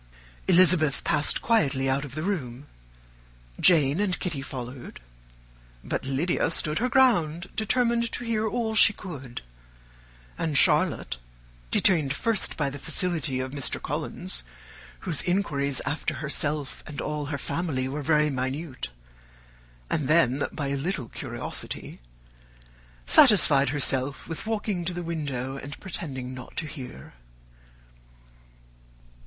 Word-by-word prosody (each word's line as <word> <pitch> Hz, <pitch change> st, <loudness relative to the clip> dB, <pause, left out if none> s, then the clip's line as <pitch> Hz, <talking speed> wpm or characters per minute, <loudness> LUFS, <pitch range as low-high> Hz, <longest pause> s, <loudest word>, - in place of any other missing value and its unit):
Elizabeth 175 Hz, -5 st, +5 dB
passed 155 Hz, -2 st, +1 dB
quietly 140 Hz, -, +2 dB
out 135 Hz, +1 st, +1 dB
of 140 Hz, -2 st, -8 dB
the 155 Hz, -, -3 dB
room, 140 Hz, -9 st, -3 dB, 0.9 s
Jane 155 Hz, -3 st, +6 dB
and 200 Hz, -3 st, 0 dB
Kitty 160 Hz, -7 st, -3 dB
followed, 125 Hz, -1 st, -7 dB, 0.8 s
but -, -, -3 dB
Lydia 135 Hz, +7 st, 0 dB
stood 155 Hz, -1 st, 0 dB
her 250 Hz, +3 st, +1 dB
ground, 185 Hz, -, +3 dB
determined 235 Hz, +1 st, +1 dB
to -, -, -4 dB
hear 220 Hz, -2 st, 0 dB
all 220 Hz, +1 st, -1 dB
she 220 Hz, -1 st, +6 dB
could; 140 Hz, -, -8 dB, 1.0 s
and 160 Hz, -3 st, 0 dB
Charlotte, -, -, +3 dB, 0.5 s
detained 150 Hz, -, +3 dB
first 225 Hz, +5 st, 0 dB
by 150 Hz, -, +1 dB
the 140 Hz, +1 st, -5 dB
civility 160 Hz, -2 st, 0 dB
of 130 Hz, 0 st, -3 dB
Mr. 140 Hz, -2 st, -1 dB
Collins, -, -, -4 dB, 0.6 s
whose 165 Hz, -6 st, +1 dB
inquiries 140 Hz, -8 st, 0 dB
after 145 Hz, -, -2 dB
herself 145 Hz, -1 st, -2 dB
and 145 Hz, -2 st, -7 dB
all 150 Hz, -1 st, -3 dB
her 145 Hz, -1 st, -2 dB
family 140 Hz, -3 st, -2 dB
were 145 Hz, +3 st, -4 dB
very 150 Hz, 0 st, +3 dB
minute, 130 Hz, -, -4 dB, 1.0 s
and 145 Hz, -, -1 dB
then 145 Hz, -4 st, +3 dB
by 140 Hz, -2 st, -3 dB
a 140 Hz, -, -1 dB
little 140 Hz, -4 st, -3 dB
curiosity, -, -, -5 dB, 1.1 s
satisfied 150 Hz, -, +6 dB
herself 135 Hz, -1 st, 0 dB
with 165 Hz, +6 st, -6 dB
walking 210 Hz, -5 st, -1 dB
to 180 Hz, +1 st, -2 dB
the 175 Hz, -, -4 dB
window 140 Hz, -6 st, -3 dB
and 145 Hz, +1 st, -8 dB
pretending 130 Hz, -9 st, -4 dB
not 130 Hz, 0 st, -10 dB
to 165 Hz, -, -1 dB
hear. 130 Hz, -, -9 dB
150 Hz, 125 wpm, -26 LUFS, 135-180 Hz, 1.1 s, Jane